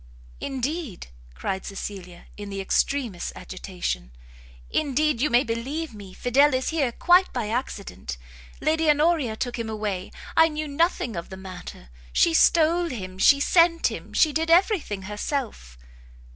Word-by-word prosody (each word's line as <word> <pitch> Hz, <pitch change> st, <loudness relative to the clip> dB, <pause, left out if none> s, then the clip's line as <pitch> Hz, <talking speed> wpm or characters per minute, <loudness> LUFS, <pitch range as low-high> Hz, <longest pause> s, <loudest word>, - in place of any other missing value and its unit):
"Indeed," 270 Hz, -, -4 dB, 0.3 s
cried 190 Hz, -, -3 dB
Cecilia, 190 Hz, -3 st, -7 dB
in 205 Hz, -1 st, -8 dB
the 195 Hz, 0 st, -5 dB
extremest 225 Hz, 0 st, 0 dB
agitation, 175 Hz, -, -5 dB, 0.6 s
"indeed 300 Hz, -3 st, +1 dB
you 300 Hz, -, +2 dB
may 240 Hz, +2 st, +4 dB
believe 265 Hz, +6 st, -3 dB
me 200 Hz, -3 st, -10 dB
Fidel 260 Hz, +7 st, +3 dB
is 255 Hz, -, -1 dB
here 290 Hz, -6 st, 0 dB
quite 355 Hz, +9 st, +4 dB
by 235 Hz, -5 st, -3 dB
accident. 205 Hz, -, -4 dB, 0.4 s
Lady 320 Hz, 0 st, +1 dB
Honoria 300 Hz, -5 st, +3 dB
took 245 Hz, +1 st, -3 dB
him 225 Hz, -1 st, -3 dB
away, 210 Hz, -4 st, -3 dB, 0.2 s
I 325 Hz, -, +7 dB
knew 310 Hz, -1 st, -4 dB
nothing 285 Hz, -, 0 dB
of 170 Hz, -, -5 dB
the 190 Hz, -, -8 dB
matter, 180 Hz, -, -10 dB, 0.2 s
she 165 Hz, -, +3 dB
stole 335 Hz, -, +4 dB
him, 185 Hz, -7 st, -7 dB
she 280 Hz, +7 st, +6 dB
sent 335 Hz, +2 st, +4 dB
him, -, -, -8 dB
she 310 Hz, -2 st, +3 dB
did 320 Hz, +2 st, 0 dB
every 375 Hz, +4 st, +5 dB
thing 205 Hz, -9 st, -6 dB
herself." 210 Hz, -, -4 dB
245 Hz, 145 wpm, -25 LUFS, 195-310 Hz, 0.6 s, I